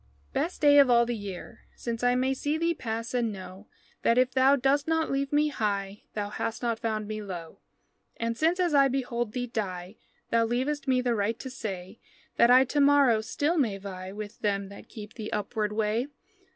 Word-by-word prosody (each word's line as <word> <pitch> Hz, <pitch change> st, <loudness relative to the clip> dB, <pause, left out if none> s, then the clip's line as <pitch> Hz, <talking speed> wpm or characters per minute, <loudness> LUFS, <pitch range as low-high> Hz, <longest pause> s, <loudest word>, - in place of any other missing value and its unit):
Best 330 Hz, +4 st, -2 dB
day 290 Hz, -1 st, +7 dB
of 275 Hz, -2 st, +6 dB
all 235 Hz, -1 st, +5 dB
the 240 Hz, 0 st, -2 dB
year, 205 Hz, +1 st, -8 dB
since 230 Hz, -1 st, -4 dB
I 245 Hz, 0 st, +3 dB
May 260 Hz, +1 st, +1 dB
see 290 Hz, +3 st, -1 dB
thee 335 Hz, +1 st, +1 dB
pass 230 Hz, -4 st, -4 dB
and 240 Hz, -3 st, +1 dB
know 190 Hz, 0 st, -10 dB, 0.3 s
That 230 Hz, -, +3 dB
if 255 Hz, 0 st, +3 dB
thou 265 Hz, +1 st, +5 dB
dost 280 Hz, +2 st, +1 dB
not 320 Hz, 0 st, +1 dB
leave 275 Hz, 0 st, -1 dB
me 300 Hz, +1 st, +3 dB
high 200 Hz, -5 st, -3 dB
Thou 205 Hz, -1 st, -2 dB
hast 225 Hz, +3 st, -4 dB
not 230 Hz, -2 st, 0 dB
found 215 Hz, -2 st, -2 dB
me 215 Hz, 0 st, -4 dB
low, 175 Hz, -5 st, -8 dB, 0.6 s
And 230 Hz, 0 st, -2 dB
since, 330 Hz, +7 st, +1 dB
as 350 Hz, -3 st, +1 dB
I 275 Hz, -1 st, +6 dB
behold 240 Hz, -4 st, -2 dB
thee 250 Hz, -1 st, -2 dB
die, 195 Hz, -4 st, -5 dB, 0.3 s
Thou 230 Hz, 0 st, +4 dB
leavest 265 Hz, +5 st, -1 dB
me 255 Hz, -1 st, +3 dB
the 245 Hz, -1 st, +1 dB
right 220 Hz, +1 st, 0 dB
to 260 Hz, -, -7 dB
say 195 Hz, -4 st, -6 dB, 0.4 s
That 235 Hz, -, +6 dB
I 255 Hz, +2 st, +7 dB
to 290 Hz, +3 st, 0 dB
morrow 280 Hz, -6 st, +5 dB
still 290 Hz, +9 st, 0 dB
may 220 Hz, -8 st, +1 dB
vie 190 Hz, -1 st, -7 dB
With 210 Hz, +1 st, -8 dB
them 200 Hz, -2 st, -1 dB
that 200 Hz, -, -12 dB
keep 210 Hz, -2 st, -9 dB
the 215 Hz, -3 st, -6 dB
upward 210 Hz, 0 st, -2 dB
way. 220 Hz, +4 st, 0 dB
235 Hz, 205 wpm, -28 LUFS, 210-270 Hz, 0.6 s, day